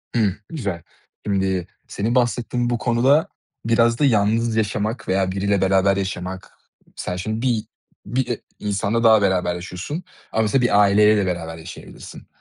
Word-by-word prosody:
Hımm. 105 -5 +2
Güzel. 100 - -4 0.4
Şimdi 95 -3 0 0.2
senin 115 +5 -2
bahsettiğin 120 0 0
bu 120 - 0
konuda 130 +6 +3 0.4
biraz 115 0 +3
da 145 - +4
yalnız 110 0 +2
yaşamak 110 +1 -1
veya 95 0 +1
biriyle 100 0 0
beraber 95 +1 +3
yaşamak 95 -1 -5 0.4
Sen 90 - -4
şimdi 110 +5 -3
bir 115 -3 0 0.4
bir, 125 +5 -1
eee, 120 -2 -3 0.2
insanla 105 +3 -1
daha 110 -2 +6
beraber 90 -3 +1
yaşıyorsun 90 - -6 0.3
ama 110 - +2
mesela 110 +5 +2
bir 110 -4 +3
aileyle 105 +1 +5
de 100 - +1
beraber 85 -3 -4
yaşayabilirsin. 80 +1 -11
105 Hz, 150 wpm, -21 LUFS, 95-115 Hz, 0.4 s, daha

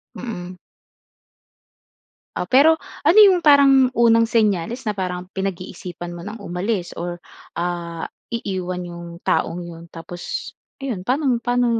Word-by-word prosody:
Mhm. 180 -6 -6 1.8
O - - -5
pero 285 +5 +7 0.4
ano 400 - +7
yung 370 -2 +4
parang 275 -3 +6
unang 230 -1 +5
senyales 225 0 +1
na 210 - -3
parang 180 -1 -3
pinag-iisipan 180 -2 -5
mo 170 - -9
ng 210 +1 -7
umalis, 180 0 -2
or, 175 0 -5 0.3
ah, 170 -1 -3 0.2
iiwan 185 -5 -3
yung 170 0 -8 0.2
taong 175 - 0
'yon? 170 -1 -9
Tapos 170 +1 -6 0.3
ayun, 225 -9 -4
pa'no 275 +4 +1
mo, 245 - +3
pa'no 245 +1 +1
190 Hz, 125 wpm, -21 LUFS, 175-240 Hz, 1.8 s, pero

